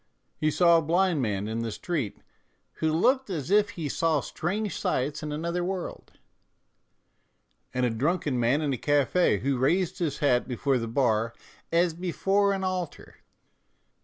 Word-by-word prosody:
He 155 - 0
saw 170 +1 +5
a - - -2
blind 170 0 +2
man 105 -3 -1
in 110 +1 -3
the 115 -1 -3
street 145 - -3 0.6
"who 160 -1 +1
looked 255 - +2
as 165 -2 -4
if 205 0 +4
he 170 -7 -4
saw 160 +2 +1
strange 195 +9 -3
sights 145 +4 -1
in 150 -1 -4
another 170 +4 -2
world," 185 0 -5 1.6
and 125 0 0
a 120 - +1
drunken 145 +2 0
man 125 +6 +2
in 145 -2 0
a 125 - -4
cafe" 145 - +2
who 135 -1 0
raised 170 +7 +1
his 160 -5 -1
hat 125 -4 +2
before 130 +1 0
the 115 - -3
bar 115 -2 +1 0.2
" - - -30
as 170 0 +3
before 195 +4 +1
an 195 -1 -2
altar." 185 -3 -4
155 Hz, 160 wpm, -27 LUFS, 130-180 Hz, 1.6 s, saw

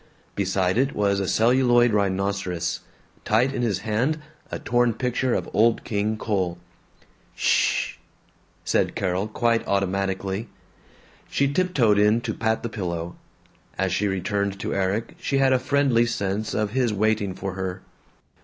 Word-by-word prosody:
Beside 95 +1 0
it 135 +1 +1
was 100 -1 +1
a 95 - -1
celluloid 120 +1 +4
rhinoceros; 100 -3 -1 0.4
tight 125 +5 +2
in - - -2
his 105 -6 0
hand 115 +9 0 0.3
a - - -2
torn 120 -2 +1
picture 125 +1 0
of - - -2
Old 115 +2 +3
King 105 +1 -1
Cole. 95 -6 -1 0.8
"Shhh!" - - +1 0.7
said - - +1
Carol, 95 +2 -1
quite 115 +1 +1
automatically. 95 +2 -1 0.8
She 140 0 +1
tiptoed 135 - +3
in 105 +2 +4
to 115 -2 -3
pat 110 0 -1
the - - -1
pillow. 85 -5 -4 0.6
As - - 0
she 105 - +1
returned 100 +1 -1
to - - -2
Erik 100 +4 -1
she 140 - -1
had 135 -1 +4
a 130 - +3
friendly 130 -3 +2
sense 105 -2 -2
of 105 -2 0
his 125 -1 +1
waiting 105 -2 0
for 95 0 -4
her. 95 0 -4
105 Hz, 145 wpm, -24 LUFS, 95-120 Hz, 0.8 s, celluloid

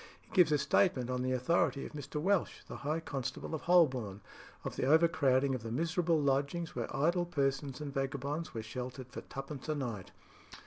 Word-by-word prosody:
He - - -25
gives 180 -6 +5
a 150 - +5
statement 130 -5 +2
on 125 0 -1
the 130 0 0
authority 135 +2 +1
of - - -7
Mr. 150 0 -5
Welch, 190 +3 +1
the - - -7
High 155 +3 -2
Constable 135 0 -4
of 160 - -2
Holborn, 130 - +3 0.4
of - - -4
the 130 - 0
overcrowding 140 -4 +4
of 130 - -2
the 115 - -5
miserable 165 +5 +1
lodgings 145 +4 0
where 120 -2 -2
idle 170 +5 +2
persons 135 -3 -1
and 145 -2 -5
vagabonds 140 +3 -2
were 110 - -5
sheltered 125 +2 -6
for - - -6
twopence 135 +2 -7
a 155 - +1
night. 115 -9 -4
140 Hz, 185 wpm, -33 LUFS, 130-160 Hz, 0.4 s, gives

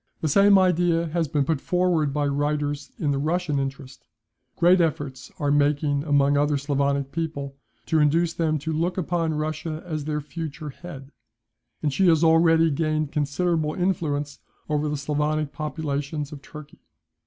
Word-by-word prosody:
"The 160 - 0
same 200 +6 +6
idea 175 -2 +2
has 165 0 0
been 145 0 0
put 155 -2 -1
forward 175 -5 +1
by 145 +1 0
writers 145 0 -1
in 150 -3 0
the 140 - 0
Russian 155 -1 0
interest; 135 0 -6 0.5
great 175 +1 +5
efforts 140 -5 -2
are 145 -1 0
making 145 0 +2
among 145 -1 +3
other 145 0 +2
Sclavonic 140 -1 -1
people, 150 -4 -4 0.3
to 160 - +1
induce 165 +3 +2
them 155 -2 0
to 160 - -1
look 170 +4 -1
upon 165 -2 -1
Russia 155 +1 -3
as 155 -4 -4
their 150 -1 -1
future 150 0 -6
head; 140 -3 -10 0.7
and 145 -3 0
she 190 +5 +3
has 165 -1 +4
already 165 0 +5
gained 155 0 -1
considerable 155 +1 0
influence 155 -6 -1 0.3
over 150 0 0
the 150 - -2
Sclavonic 150 +1 -1
populations 150 -1 -3
of 145 -2 -9
Turkey." 150 0 -12
150 Hz, 155 wpm, -24 LUFS, 145-165 Hz, 0.7 s, same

